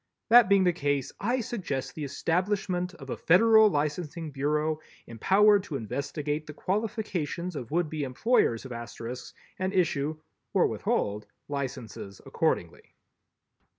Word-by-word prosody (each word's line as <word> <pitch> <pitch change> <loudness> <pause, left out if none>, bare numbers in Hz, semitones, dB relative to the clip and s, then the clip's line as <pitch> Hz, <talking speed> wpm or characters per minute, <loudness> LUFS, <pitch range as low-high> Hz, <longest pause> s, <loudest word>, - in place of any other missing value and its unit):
That 235 -3 +8
being 200 -1 +5
the 180 -1 +3
case, 145 -5 -1
I 245 +5 0
suggest 195 - -4
the 155 - -6
establishment 180 +4 -1
of 135 -4 -9
a - - -1
Federal 220 +5 +6
Licensing 155 0 -2
Bureau 150 +3 0 0.3
empowered 200 - +4
to 150 - -5
investigate 145 +5 -3
the 150 - -8
qualifications 185 -4 -2
of 125 -5 -6
would 170 +2 +1
be 150 -1 -3
employers 130 - +1
of 130 - -8
Asterisks 120 +1 -7 0.2
and 190 +1 0
issue 155 -5 0 0.4
or - - +5
withhold 105 +1 -1 0.2
licenses 125 -8 -5
accordingly. - - -2
155 Hz, 130 wpm, -28 LUFS, 140-190 Hz, 0.4 s, That